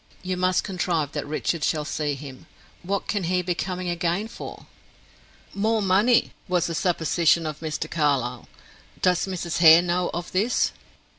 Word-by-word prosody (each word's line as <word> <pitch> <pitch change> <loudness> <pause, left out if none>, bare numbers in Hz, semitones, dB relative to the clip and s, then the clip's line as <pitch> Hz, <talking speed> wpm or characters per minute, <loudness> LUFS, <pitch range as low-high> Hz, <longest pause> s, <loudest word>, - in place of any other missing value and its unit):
You 185 0 -2
must 185 0 +1
contrive 175 -6 -1
that 150 -2 -4
Richard 155 +1 -2
shall 150 -2 0
see 150 -1 -2
him. 135 -2 -10 0.3
What 195 +2 -2
can 205 -4 -1
he 180 +1 +1
be 180 0 0
coming 180 0 -4
again 175 +4 -1
for?" - - -9 0.9
"More 220 +3 +1
money," 205 +5 +3 0.2
was 180 -2 +1
the 170 - -3
supposition 170 -1 +2
of 155 -1 -4
Mr. 155 -1 -3
Carlyle. 135 -6 0 0.6
"Does 180 +1 +2
Mrs. 175 -3 -3
Hare 165 0 +8
know 180 0 0
of 175 +1 -5
this?" 205 +6 +1
175 Hz, 155 wpm, -24 LUFS, 155-185 Hz, 0.9 s, Hare